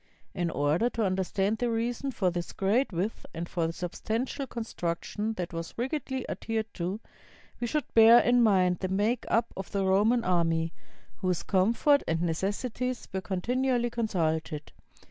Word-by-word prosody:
In 175 -2 -1
order 155 +10 +1
to 230 -3 -1
understand 195 +3 0
the 245 - +1
reason 235 +4 -1
for 190 -8 0
this 175 0 -4
great 215 +8 +1
width 185 +5 -2
and 170 +1 -4
for 170 -2 -1
the - - -2
substantial 220 - -3
con 235 -2 -4
struction 210 +3 -3
that 175 -3 -4
was 165 0 -5
rigidly 265 0 -2
adhered 220 -1 -3
to, 185 +4 -3 0.6
we 240 - -1
should 300 +4 0
bear 225 +1 +9
in 245 0 +4
mind 185 -5 +3
the 190 - -1
make 205 +6 0
up 230 0 +1
of 190 - -6
the 195 -1 0
Roman 210 +5 +3
army, 165 -2 +1 0.4
whose 180 -2 -1
comfort 230 +9 +3
and 165 +1 0
necessities 215 +9 -2
were 190 - -1
continually 240 +6 0
consulted. 160 -9 -1
200 Hz, 160 wpm, -29 LUFS, 175-235 Hz, 0.6 s, bear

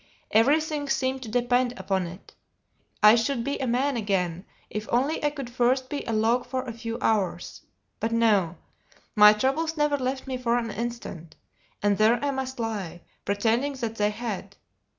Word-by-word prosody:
Everything 290 +5 +2
seemed 260 0 0
to 235 - -7
depend 245 +1 +1
upon 190 -2 -1
it; 175 +3 -12 0.7
I 210 +1 +9
should 235 +1 +1
be 280 +3 -2
a 265 - -1
man 260 +4 +1
again, 190 -5 -1 0.2
if 215 +1 -5
only 270 +7 +1
I 295 - +3
could 280 -4 -6
first 255 +2 +1
be 290 - -3
a - - -1
log 225 +3 +2
for 260 -1 -3
a 245 -3 -6
few 230 0 -5
hours. 195 -7 -1 0.4
But 225 - -1
no; 210 -7 +2 0.6
my 210 -1 +9
troubles 295 +9 -1
never 295 -1 +2
left 260 0 -3
me 260 -2 -3
for 240 -1 +1
an 230 -2 -2
instant; 220 -8 -6 0.5
and 205 0 +2
there 220 +3 +5
I 285 - +1
must 265 -1 -4
lie, 205 -7 -4 0.2
pretending 230 +7 +1
that 230 -4 -4
they 210 0 +2
had! 210 -3 -5
235 Hz, 170 wpm, -26 LUFS, 210-265 Hz, 0.7 s, I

